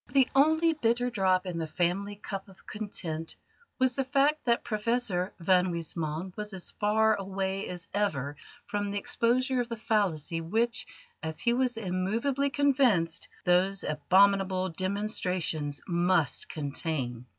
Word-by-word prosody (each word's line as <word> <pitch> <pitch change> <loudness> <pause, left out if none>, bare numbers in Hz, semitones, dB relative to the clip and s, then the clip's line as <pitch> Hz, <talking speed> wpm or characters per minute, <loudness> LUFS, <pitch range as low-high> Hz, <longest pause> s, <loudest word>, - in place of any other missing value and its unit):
The 270 -3 +5
only 315 +4 +4
bitter 245 -3 +1
drop 190 -4 +2
in 175 -2 -3
the 160 - -2
family 180 +5 -1
cup 195 -1 -6
of 195 - -18
content 170 -6 -5 0.4
was 260 -1 +2
the 270 - +1
fact 280 +3 +2
that 235 -1 +2
Professor 215 -4 -1
van 180 +1 +4
Huysman 165 +1 -3
was 210 -1 -5
as 185 - -3
far 220 +1 +3
away 195 -1 -2
as 175 -2 -6
ever 145 -9 -1 0.3
from 205 0 -2
the 200 - -2
exposure 250 +5 +1
of 240 - -5
the 230 - -3
fallacy 185 -7 0
which, 230 +8 0 0.3
as 160 0 -5
he 235 - +2
was 250 -1 +1
immovably 225 +9 0
convinced, 260 - +2 0.2
those 185 +2 +2
abominable 190 +4 +3
demonstrations 180 -5 -1
must 175 -4 +1
contain. 140 -5 -3
195 Hz, 140 wpm, -29 LUFS, 175-235 Hz, 0.4 s, The